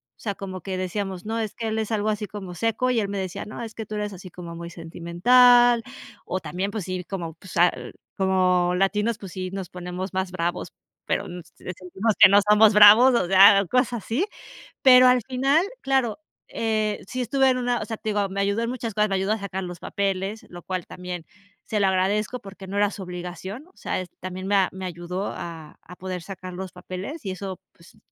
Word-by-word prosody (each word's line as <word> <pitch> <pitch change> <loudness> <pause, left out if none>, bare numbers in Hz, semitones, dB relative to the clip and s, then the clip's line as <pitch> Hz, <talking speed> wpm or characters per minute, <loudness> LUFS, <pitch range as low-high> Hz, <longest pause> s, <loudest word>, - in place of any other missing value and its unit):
O - - -47
sea, 205 -3 -2
como 190 -2 -7
que 190 0 -4
decíamos, 190 0 -4
no, 225 +1 -2
es 220 -2 -3
que 225 -1 -4
él 220 0 -1
es 220 +1 -3
algo 215 -1 0
así 210 0 -2
como 195 -4 -8
seco, 230 +4 0
y 235 - +2
él 200 - -3
me 200 - -3
decía: 185 -2 -4
"No, 215 - -8
es 225 -1 -7
que 220 - -5
tú 215 - -6
eres 210 -1 -3
así, 185 0 -10
como 170 -1 -9
muy 170 0 -7
sentimental". 235 +9 +4 0.4
O 185 - -2
también, 185 +2 -3
pues 210 -5 -4
sí, 185 -1 -4
como 170 -4 -5
pues, 185 +1 -10
al 175 +1 +1 0.2
como 185 -2 +2
latinos, 210 +4 +1
pues 195 -5 -10
sí, 185 -1 -4
nos 195 -2 -5
ponemos 180 +1 -6
más 190 -1 -2
bravos, 175 -1 -3 0.3
pero, - - -1
eh, 180 0 -7 0.3
sentimos 190 +5 -1
que 190 - +10
no 200 - +7
somos 210 0 +6
bravos. 215 +5 +8
O 210 - +1
sea, 195 +2 +7
cosas 250 +6 +1
así. 260 - 0 0.6
Pero 255 -1 +8
al 250 -1 +5
final, 270 +5 +2 0.2
claro, 265 -2 0 0.3
eh, 215 -2 -1
sí, 255 - -3
estuve 265 +3 +2
en 255 - +2
una, 245 -1 0
o - - -4
sea, 225 - -4
te 220 - -4
digo, 205 -1 +1
me 200 +1 -3
ayudó 200 +3 0
en 230 - -2
muchas 235 -4 -4
cosas. 210 -1 +2
Me 195 - 0
ayudó 195 +2 0
a - - -1
sacar 190 -1 -4
los 175 -1 -7
papeles, 195 +2 -2
lo 175 -1 -10
cual 185 -2 -4
también, 180 -2 -7 0.4
se 215 - -1
lo 195 - +3
agradezco, 205 +6 0
porque 195 -2 -11
no 195 - -6
era 205 0 +3
su 195 - -7
obligación. 180 - -7
O 375 - -26
sea, - - -3
es, 180 - -9
también 185 +1 -6
me 195 -2 +3
me 190 0 -7
ayudó 180 +2 -4
a 165 -3 -8
a 180 - -13
poder 185 -1 -5
sacar 185 -1 -8
los 185 -1 -6
papeles, 185 - -7
y 190 - -2
eso 190 0 -6
pues, 170 +5 -20
195 Hz, 220 wpm, -24 LUFS, 185-220 Hz, 0.6 s, que